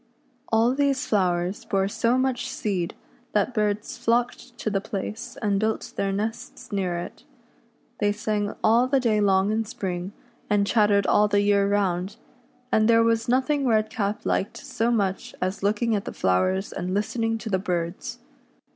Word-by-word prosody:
All 225 +2 +4
these 275 -1 +1
flowers 180 -2 0
bore 195 -1 0
so 230 +4 +1
much 260 -1 0
seed 195 -9 -2 0.4
that 210 +4 +1
birds 210 0 -1
flocked 240 +1 -1
to 215 - -2
the 195 -1 0
place 215 +5 -5
and 200 -2 +2
built 220 +1 -2
their 195 0 0
nests 225 +5 -4
near 185 -4 -1
it. 175 - -7 0.8
They 205 -1 +2
sang 210 0 -2
all 235 +3 +4
the 270 +1 +3
day 220 -4 +2
long 195 0 +3
in 220 +1 +1
spring, 190 -3 -4 0.4
and 205 -1 +3
chattered 205 -2 +3
all 210 - +4
the 205 0 +2
year 200 -1 +3
round, 195 -1 0 0.6
and 215 -2 +4
there 230 0 +5
was 230 0 +1
nothing 265 +2 +2
Redcap 215 -2 0
liked 195 - -1
so 230 +1 -2
much 200 -5 -1
as 185 +2 -2
looking 215 +3 +1
at 200 - -2
the - - -5
flowers 185 - +1
and 185 +2 -3
listening 225 +2 0
to 220 -1 -6
the 190 - +2
birds. 175 -2 -3
210 Hz, 165 wpm, -25 LUFS, 195-230 Hz, 0.8 s, there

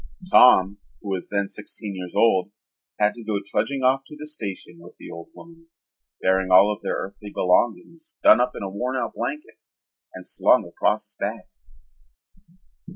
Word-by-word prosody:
Tom, 100 -5 +6 0.2
who 100 - -6
was 95 -2 -4
then 100 -1 -1
sixteen 105 +1 -6
years 90 -1 -8
old, 100 -5 +3 0.5
had 105 0 +2
to 120 - -11
go 105 -2 -2
trudging 120 +7 -2
off 130 +1 +3
to 150 - -11
the 150 - -8
station 100 - -6
with 85 - -15
the - - -11
old 85 0 -9
woman, 165 0 -16 0.6
bearing 95 0 +2
all 95 +3 +6
of 105 - -12
their - - -2
earthly 100 +2 -7
belongings 120 - -1
done 120 - +7
up 125 - -1
in - - -6
a - - -3
worn 125 +7 -3
out 130 - -3
blanket 150 +2 -6 0.6
and - - -10
slung - - +3
across - - -1
his - - -15
back. - - -4
105 Hz, 170 wpm, -23 LUFS, 95-125 Hz, 0.6 s, done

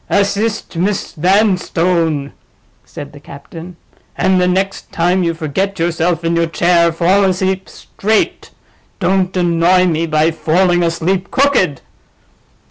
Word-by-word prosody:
"Assist 200 +1 -1
Miss 195 +3 -1
Vanstone," 175 -5 +1 0.5
said 145 0 -10
the 145 - -12
captain. 165 +5 -11 0.4
"And 185 0 +2
the 180 - +2
next 190 +2 -2
time 175 +2 +1
you 170 -1 -1
forget 185 +5 -3
yourself 170 0 -1
in 165 0 0
your 170 0 +1
chair, 170 0 +2
fall 180 +4 +2
asleep 190 0 -1
straight—don't 195 -2 -3
annoy 175 +1 +3
me 165 -1 0
by 155 +1 +2
falling 175 +3 +1
asleep 175 +3 -1
crooked." 255 - +1
175 Hz, 120 wpm, -15 LUFS, 165-190 Hz, 0.5 s, annoy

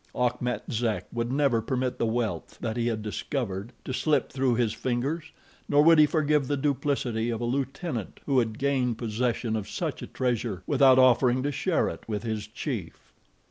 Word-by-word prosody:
Achmet 125 0 0
Zek 115 -2 -1
would 120 +1 -2
never 135 -4 +2
permit 125 +2 -2
the 115 - +1
wealth 115 -1 -2
that 110 -2 -3
he 120 -1 0
had 110 -2 -2
discovered 105 -1 -3
to 130 - -3
slip 150 +4 +1
through 130 -2 +1
his 115 -2 +1
fingers, 135 +7 -2 0.4
nor 145 0 +5
would 165 0 +7
he 150 - +7
forgive 150 -2 +1
the 145 - 0
duplicity 135 -5 0
of 115 -2 -2
a 120 - -2
lieutenant 135 - -3
who 135 -3 +3
had 110 -2 -1
gained 130 -4 0
possession 115 0 -1
of 105 -3 -4
such - - -3
a - - -6
treasure 120 -7 -2
without 135 -2 +5
offering 130 0 +4
to 145 - 0
share 165 +5 +1
it - - -5
with 105 -2 -3
his 110 -2 -3
chief. 110 - -6
125 Hz, 180 wpm, -27 LUFS, 115-140 Hz, 0.4 s, would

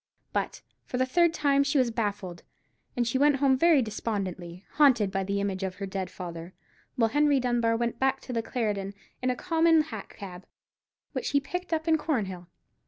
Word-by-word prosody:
But, - - -2 0.2
for 250 - -4
the 255 - +2
third 340 +6 +3
time, 280 -3 +2
she 280 +1 +1
was 255 -3 +3
baffled; 205 -6 -3 0.6
and 240 -1 +1
she 260 +3 0
went 290 0 +5
home 275 -1 +3
very 310 -1 +4
despondently, 190 -5 -4
haunted 250 -9 +5
by 195 -1 -1
the 200 +1 -1
image 200 -1 -2
of 190 -1 -3
her 200 - -5
dead 190 -1 -4
father; 175 -1 -8 0.4
while 225 -2 +2
Henry 290 +1 +3
Dunbar 240 -2 +1
went 235 0 -2
back 265 0 +2
to 255 - -7
the 230 - 0
Clarendon 205 -5 -2 0.3
in 255 - 0
a 250 - +1
common 330 0 +3
hack 225 -10 -8
cab, 190 -2 -9 0.6
which - - -3
he 285 - +3
picked 360 +6 -5
up 320 0 -1
in 320 -1 +4
Cornhill. 195 - -2
235 Hz, 190 wpm, -28 LUFS, 195-280 Hz, 0.6 s, went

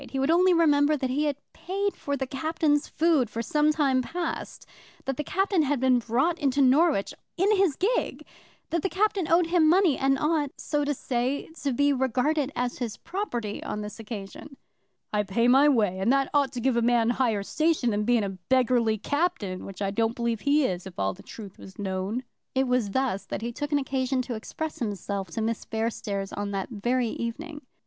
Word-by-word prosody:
He 270 - -4
would 270 +4 +2
only 365 +2 +5
remember 300 -3 +4
that 260 -2 -2
he 295 +4 +1
had 290 -1 0 0.2
paid 395 +3 -2
for 285 0 -3
the 265 - -2
Captain's 295 +2 0
food 310 -7 +2
for 230 +1 -4
some 300 +4 +2
time 275 -4 +2
past, 335 +5 -5 0.4
that 270 - -1
the 300 - -3
Captain 385 +2 +1
had 290 -2 +1
been 255 -1 +4
brought 260 +10 0
into 280 -2 +1
Norwich 275 - +3 0.2
in 400 +4 +3
his 380 -7 +2
gig, 460 - -1 0.5
that 335 0 +1
the 385 - -1
Captain 390 -4 0
owed 340 +1 +5
him 330 -2 +3
money, 355 -4 +4
and 270 0 +2
ought, 300 0 +1
so 295 -1 -1
to 290 0 -1
say, 255 +2 -2
to 280 - 0
be 285 +3 +2
regarded 265 +3 0
as 245 0 -2
his 235 -4 -4
property 245 - -4
on 210 - -4
the 210 0 -6
occasion. 225 +6 -8 0.6
"I 210 - +3
pay 210 +4 +1
my 270 +4 +6
way, 210 -8 +2
and 200 +6 +2
that 275 0 +2
ought 285 -3 +3
to 250 - -4
give 255 +1 +1
a - - +3
man 235 0 +3
higher 230 -5 0
station 310 -1 +1
than 210 0 0
being 235 0 +2
a 200 - -1 0.2
beggarly 245 -4 +3
captain, 230 - -2
which 195 +1 -6
I 195 - 0
don't 225 +3 0
believe 235 -2 -1
he 290 0 +3
is, 180 -3 -3
if 185 - -12
all 95 0 0
the - - -14
truth 205 -4 -11
was 190 - -12
known." 195 +4 -3 0.3
It 265 0 +2
was 250 -4 +1
thus 250 -3 -1
that - - -4
he 235 - -2
took 290 +5 -5
an 290 - +3
occasion 265 -1 -1
to 245 - -5
express 305 +8 -5
himself 200 -3 -3
to 220 +7 -3
Miss 225 0 -2
Fairstairs 215 -3 -3
on 205 0 -3
that 195 -1 -3
very 240 +3 0
evening. 290 +8 -5
260 Hz, 205 wpm, -26 LUFS, 225-300 Hz, 0.6 s, my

